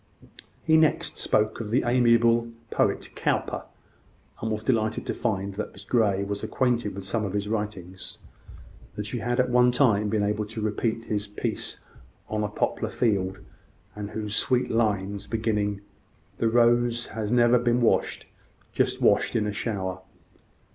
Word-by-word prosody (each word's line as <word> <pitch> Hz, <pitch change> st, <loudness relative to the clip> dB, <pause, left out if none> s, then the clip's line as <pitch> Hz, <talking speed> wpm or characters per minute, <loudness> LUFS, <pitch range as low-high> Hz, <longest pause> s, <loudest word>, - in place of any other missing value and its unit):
He 160 Hz, -, +4 dB
next 160 Hz, -2 st, +1 dB
spoke 110 Hz, +2 st, +1 dB
of 105 Hz, -, -5 dB
the 125 Hz, +5 st, +2 dB
amiable 115 Hz, -1 st, +4 dB, 0.2 s
poet, -, -, 0 dB
Cowper, -, -, -1 dB, 0.8 s
and 110 Hz, -, -2 dB
was 110 Hz, 0 st, -2 dB
delighted 110 Hz, -2 st, 0 dB
to -, -, -2 dB
find 100 Hz, -4 st, -2 dB
that 105 Hz, +2 st, -5 dB
Miss 100 Hz, -, -11 dB
Grey 100 Hz, -3 st, +2 dB
was 100 Hz, 0 st, -4 dB
acquainted 120 Hz, -6 st, 0 dB
with 100 Hz, -, -6 dB
some 110 Hz, +3 st, -1 dB
of 100 Hz, -2 st, -3 dB
his 105 Hz, 0 st, -1 dB
writings; 105 Hz, -4 st, -4 dB, 0.8 s
that 105 Hz, -, -4 dB
she 115 Hz, +4 st, -4 dB
had 120 Hz, +2 st, -1 dB
at 125 Hz, -1 st, +2 dB
one 125 Hz, 0 st, +5 dB
time 110 Hz, -5 st, +3 dB
been 105 Hz, -1 st, +1 dB
able 105 Hz, +1 st, -1 dB
to 110 Hz, +1 st, -7 dB
repeat 110 Hz, +2 st, -1 dB
his 105 Hz, -1 st, -2 dB
piece 105 Hz, -, -3 dB, 0.5 s
on 105 Hz, 0 st, -1 dB
a -, -, 0 dB
Poplar -, -, -1 dB
Field, 95 Hz, -5 st, 0 dB, 0.5 s
and 105 Hz, -1 st, -5 dB
those 105 Hz, -1 st, -3 dB
sweet 125 Hz, -1 st, +2 dB
lines 100 Hz, -3 st, 0 dB
beginning 105 Hz, -2 st, -1 dB, 0.6 s
"The 115 Hz, -, +2 dB
rose 120 Hz, 0 st, +3 dB
had 110 Hz, -2 st, -4 dB, 0.3 s
been 120 Hz, 0 st, +2 dB
washed, 120 Hz, -, +1 dB, 0.5 s
just -, -, 0 dB
washed -, -, +3 dB
in 110 Hz, -, +2 dB
a 105 Hz, -, -2 dB
shower." 95 Hz, -4 st, -3 dB
110 Hz, 155 wpm, -26 LUFS, 100-120 Hz, 0.8 s, one